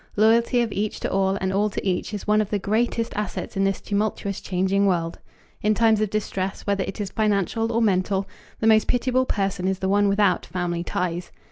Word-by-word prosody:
Loyalty 230 +3 +4
of 230 -3 -1
each 210 +1 -2
to - - -2
all 195 0 +1
and 190 0 -1
all 205 +2 +2
to 205 - -4
each 185 +3 -1
is 205 -2 -5
one 210 0 +3
of 210 - -3
the 210 - 0
greatest 230 +3 0
assets 210 -1 -4
in 195 - +1
this 195 -1 0
tumultuous, 200 -1 -2
changing 190 +2 +1
world. 170 -3 -1 0.4
In 210 +1 +2
times 220 -1 +3
of 215 - +1
distress, 195 -2 -3
whether 200 -1 0
it - - -7
is 200 -2 -3
financial 215 +1 0
or 230 0 +1
mental, 195 -1 +1 0.3
the - - +1
most 220 -1 +5
pitiable 255 +1 +1
person 195 -2 -1
is 190 0 0
the 190 0 -2
one 205 +1 +3
without 200 -3 +2
family 175 -2 -2
ties. 175 0 -3
200 Hz, 210 wpm, -24 LUFS, 190-215 Hz, 0.4 s, most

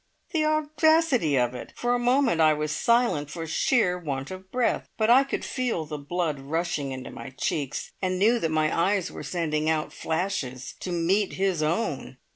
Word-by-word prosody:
The 315 -4 +1
audacity 310 - +3
of 125 -1 +1
it! 125 - -8
For 240 0 0
a 245 - +1
moment 245 -7 +2
I 155 -1 +5
was 150 0 -2
silent 235 - +2
for 165 +2 -5
sheer 180 - +2
want 140 -2 -4
of 185 0 -9
breath, 250 -2 0
but 220 +1 +3
I 260 +3 +7
could 275 - -4
feel 245 -11 -2
the 150 -1 -6
blood 155 0 -2
rushing 150 0 -2
into 130 -1 -6
my - - -8
cheeks, 140 +1 -3
and 185 -1 0
knew 225 +5 +4
that 165 - 0
my 155 -1 +1
eyes 190 +2 +1
were - - -8
sending 155 -3 -1
out 155 -1 -1
flashes 155 -7 -3
to 185 - -5
meet 185 +4 +1
his 190 -4 0
own. 155 - -1
175 Hz, 185 wpm, -26 LUFS, 150-235 Hz, -, I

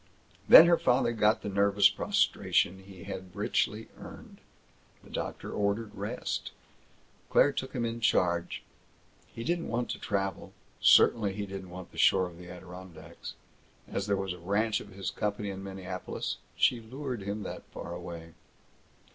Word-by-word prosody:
Then 165 - +12
her 170 -1 +4
father 125 -1 +2
got 110 -1 +2
the - - -4
nervous 100 0 +4
prostration 95 +2 +1
he 95 -2 -12
had 95 -2 -8
richly 110 +1 -1
earned. - - -11 0.6
The - - -16
doctor - - -5
ordered 105 +1 -1
rest. 105 +5 -4 0.8
Claire 145 - +5
took 130 -1 -5
him 120 -2 -1
in 115 0 -3
charge. 85 -6 +1 0.6
He 115 - -8
didn't 170 +5 -1
want 120 +1 -2
to - - -5
travel. 95 -2 -3 0.3
Certainly 105 -4 +5
he 100 +1 -4
didn't 95 -1 -8
want 90 0 -9
the - - -9
shore 90 -1 +4
or - - -14
the 90 +1 -12
Adirondacks. 90 -2 -10 0.5
As 100 - -3
there 100 -1 +1
was 95 -2 -2
a 90 - -11
branch 105 +5 0
of 100 - -11
his 95 0 -5
company 105 -1 -2
in 95 0 -7
Minneapolis, 95 -1 -5 0.2
she 120 - +3
lured 125 0 -5
him 100 +2 -4
that - - -6
far 85 - -8
away. 85 -1 -8
100 Hz, 155 wpm, -30 LUFS, 95-110 Hz, 0.8 s, Then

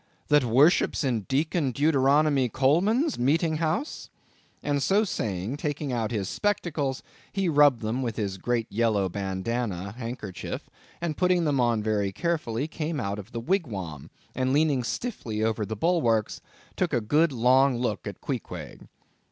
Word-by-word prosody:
that 150 -2 +5
worships 135 +9 +3
in 125 -5 +1
Deacon 150 +1 +1
Deuteronomy 140 -1 +3
Coleman's 190 - +2
meeting 155 +5 +2
house?" 165 - -2 0.5
and 145 -1 0
so 200 +8 +3
saying, 105 - -3
taking 145 -2 -3
out 115 -3 -1
his 105 -5 -2
spectacles, 155 - -1 0.3
he 195 -2 0
rubbed 145 -6 +4
them 115 +4 -1
with 115 -4 -2
his 100 -4 -3
great 120 +2 0
yellow 105 -3 +1
bandana 100 +1 -3
handkerchief, 115 -4 -6 0.3
and 165 -3 -2
putting 180 -2 +2
them 145 -3 +1
on 120 -3 +2
very 105 -2 0
carefully, 150 - -1
came 155 -1 -3
out 100 -3 -3
of 105 +4 -10
the 115 - -4
wigwam, 110 - -3 0.2
and 130 +1 0
leaning 145 -3 +2
stiffly 115 - -3
over 110 -2 0
the 110 - -3
bulwarks, 115 - +1 0.3
took 180 -4 -1
a 120 - +3
good 150 +9 +2
long 130 +1 +4
look 115 -5 -2
at - - -7
Queequeg. - - -6
130 Hz, 150 wpm, -26 LUFS, 110-155 Hz, 0.5 s, that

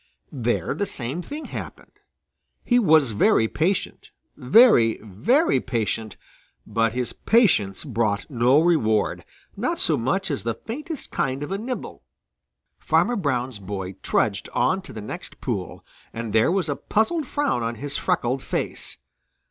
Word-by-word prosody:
There 120 -3 -1
the 205 - -2
same 135 +5 -3
thing 295 - -7
happened. - - -8 0.7
He 245 0 +4
was 155 - +4
very 110 +1 +3
patient, 170 - -2 0.3
very, 125 - +5
very 135 - +2
patient, 115 -3 -3 0.5
but 115 +1 0
his 125 -1 -2
patience 160 - +2
brought 110 -7 -1
no 125 +1 +3
reward, 155 -11 +2 0.3
not - - -1
so - - +2
much 175 +10 -1
as 140 - -2
the 115 +2 -2
faintest 300 +7 -6
kind 135 0 -1
of 145 - -6
a 195 - -2
nibble. 250 +3 -5 0.8
Farmer 245 - +2
Brown's 130 - -1
boy 95 -1 -5
trudged - - 0
on 190 +1 +1
to 190 - -12
the 110 - -7
next 105 - -7
pool, - - -4 0.3
and 115 -2 -5
there 110 +8 +4
was 190 -1 0
a 145 - -1
puzzled 280 - 0
frown 290 - 0
on 115 0 -2
his 145 +5 -5
freckled 125 +2 0
face. - - -4
130 Hz, 145 wpm, -24 LUFS, -, 0.8 s, very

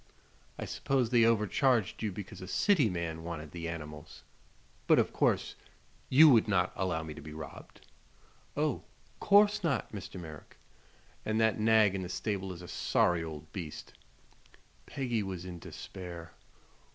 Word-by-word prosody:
"I - - -4
suppose 130 -4 0
they 120 -2 +5
overcharged 115 +1 +2
you 110 -2 -1
because 95 0 -8
a 95 - -7
city 155 - +3
man 85 -3 -4
wanted 80 -3 -6
the 85 -1 -5
animals. 75 -1 -8 0.6
But - - +6
of - - +2
course - - +1 0.6
you 155 +5 +8
would 115 -5 +5
not 90 -3 +1
allow 90 -4 -1
me 80 -1 -7
to - - -10
be 75 +1 -9
robbed." 80 -2 -10 0.7
"Oh, - - 0 0.4
'course 205 0 +5
not, 140 -9 0
Mr. 95 -2 -7
Merrick!" 80 -3 -11 0.7
"And 110 +1 0
that 110 -1 +2
nag 110 -2 +5
in 95 - -2
the 90 - -5
stable 95 0 -3
is 90 -1 -9
a - - -9
sorry 85 -1 +1
old 80 -1 -8
beast." 85 -6 -7 0.9
Peggy 125 -5 -1
was 95 -3 -5
in 90 -2 -7
despair. 85 -2 -9
95 Hz, 150 wpm, -31 LUFS, 85-110 Hz, 0.9 s, you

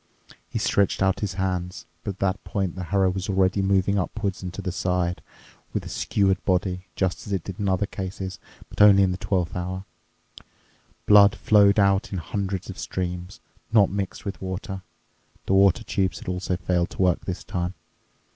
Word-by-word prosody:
He - - -3
stretched 100 -1 +1
out 95 -1 +2
his 100 -4 -3
hands. 90 -2 -2 0.2
But 100 - -3
at - - -33
that 95 -1 0
point 95 -2 -2
the 95 -1 -5
harrow 95 +1 +2
was 95 +1 -4
already 95 0 +2
moving 95 +1 +2
upwards 100 +1 -3
and 90 -1 -5
to - - -8
the 90 - -2
side, 90 -1 -1 0.5
with - - -1
the - - -8
skewered 95 -1 +1
body—just 95 0 -1
as - - -6
it 95 -3 -1
did 95 -1 -7
in 100 -1 0
other 95 +2 +1
cases, 95 -1 -6 0.3
but - - -3
only 100 -1 +8
in 95 - +2
the 90 - -3
twelfth 90 -2 -1
hour. 90 +1 -4 1.2
Blood 105 0 +7
flowed 100 -2 +4
out 100 +2 +3
in 95 - -2
hundreds 95 +2 -3
of - - -8
streams, 90 0 -4 0.3
not 105 -5 +5
mixed 100 -1 -4
with 100 - -5
water—the 95 -1 -7
water 95 -1 +4
tubes 95 -2 -1
had - - -11
also 90 0 -2
failed 90 -1 0
to - - -5
work 90 -2 +1
this 95 -1 -4
time. 90 +1 -3
95 Hz, 180 wpm, -25 LUFS, 90-100 Hz, 1.2 s, only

